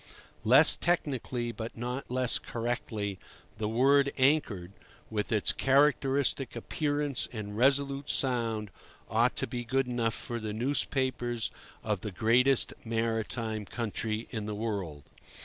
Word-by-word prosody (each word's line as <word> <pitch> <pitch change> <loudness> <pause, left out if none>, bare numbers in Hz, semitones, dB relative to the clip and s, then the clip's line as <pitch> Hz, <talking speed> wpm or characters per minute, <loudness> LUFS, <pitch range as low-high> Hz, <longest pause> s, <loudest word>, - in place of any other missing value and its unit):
Less - - +7
technically, 130 -8 -1
but 115 +1 -7
not 125 +3 -4
less 125 -1 +2
correctly, 115 -4 -3 0.4
the 105 -1 -1
word 140 +4 +4
"anchored," 130 - +2 0.4
with 105 -2 -2
its 105 -2 +3
characteristic 135 -1 +2
appearance 145 +3 -1
and 105 -3 -6
resolute 140 +3 +1
sound, 115 -5 0 0.4
ought - - +3
to - - -1
be 120 +1 -4
good 130 +2 0
enough 120 -2 0
for 120 -1 -4
the 110 -1 -4
newspapers 120 -3 -1 0.3
of 105 -4 -1
the 105 - -4
greatest 120 +7 +3
maritime 115 -1 -2
country 110 +1 -3
in 110 -3 -4
the 105 - -3
world. 100 -10 -4
120 Hz, 125 wpm, -30 LUFS, 110-135 Hz, 0.4 s, Less